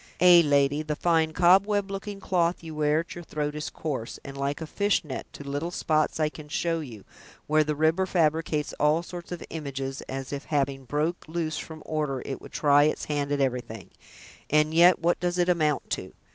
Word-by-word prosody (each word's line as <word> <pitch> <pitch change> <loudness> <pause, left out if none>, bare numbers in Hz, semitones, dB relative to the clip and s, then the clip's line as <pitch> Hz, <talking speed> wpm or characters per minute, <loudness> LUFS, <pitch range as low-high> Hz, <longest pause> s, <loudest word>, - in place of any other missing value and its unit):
Ay, 175 -1 +8
lady, 145 0 +2
the 155 -1 -3
fine 160 0 +2
cobweb 195 +4 +3
looking 200 +1 -5
cloth 175 -3 0
you 160 -1 -7
wear 150 +1 +2
at 170 - -10
your 175 - -8
throat 150 -2 -3
is 150 0 -4
coarse, 135 -7 -5
and 140 - -8
like 140 +1 -2
a 160 - -5
fishnet, 185 -5 -1
to - - -10
little 145 +4 -2
spots 155 -3 0
I 155 - +3
can 150 -1 -9
show 165 +2 0
you, 120 -10 -9 0.4
where 155 +1 +3
the 150 0 -2
river 160 +5 +2
fabricates 155 -3 0
all 150 +3 +3
sorts 175 0 -9
of 175 - -5
images, 135 -3 -4
as 135 +1 -5
if 140 0 -5
having 135 -2 -1
broke 150 +6 -2
loose 160 -2 -2
from 160 -1 -9
order, 150 -4 -2
it 135 - -5
would - - -12
try 145 -1 +4
its 155 - -1
hand 145 -1 -2
at 145 - +1
everything. 120 -5 -3 0.6
And 150 +1 +3
yet 175 +2 +7
what 175 +1 +1
does 175 0 -1
it 175 0 +2
amount 155 -5 +1
to! - - -3
155 Hz, 200 wpm, -27 LUFS, 145-170 Hz, 0.6 s, Ay